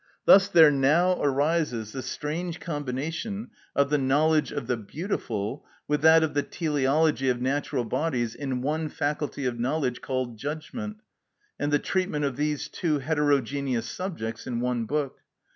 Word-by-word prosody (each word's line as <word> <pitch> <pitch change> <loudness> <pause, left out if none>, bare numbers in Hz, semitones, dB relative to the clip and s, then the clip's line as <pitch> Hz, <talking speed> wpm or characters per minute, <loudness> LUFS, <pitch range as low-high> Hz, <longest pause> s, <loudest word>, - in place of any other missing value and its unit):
Thus 195 0 +8
there 160 -6 +7
now 155 +7 +3
arises 140 -5 +1
the 135 - -5
strange 165 +6 -4
combination 165 - -4 0.2
of 140 0 +2
the 150 - +3
knowledge 150 +4 +2
of 140 - -4
the 125 +1 0
beautiful 115 - -4 0.2
with 150 -1 0
that 160 +1 +7
of 155 -2 -1
the 145 - +2
teleology 150 -2 +1
of 125 -1 +1
natural 135 0 -1
bodies 120 -2 -1
in 130 -3 -3
one 155 +2 -1
faculty 145 -1 -2
of 120 -2 -2
knowledge 130 0 -1
called 130 -3 -3
judgment, 205 - -5 0.6
and 145 0 0
the 145 - +5
treatment 180 -3 -1
of 135 -3 -2
these 150 +1 -1
two 155 -4 -1
heterogeneous 140 -4 0
subjects 115 - -5
in 120 -2 -2
one 120 -1 -1
book. 145 +2 -2
145 Hz, 150 wpm, -26 LUFS, 130-160 Hz, 0.6 s, Thus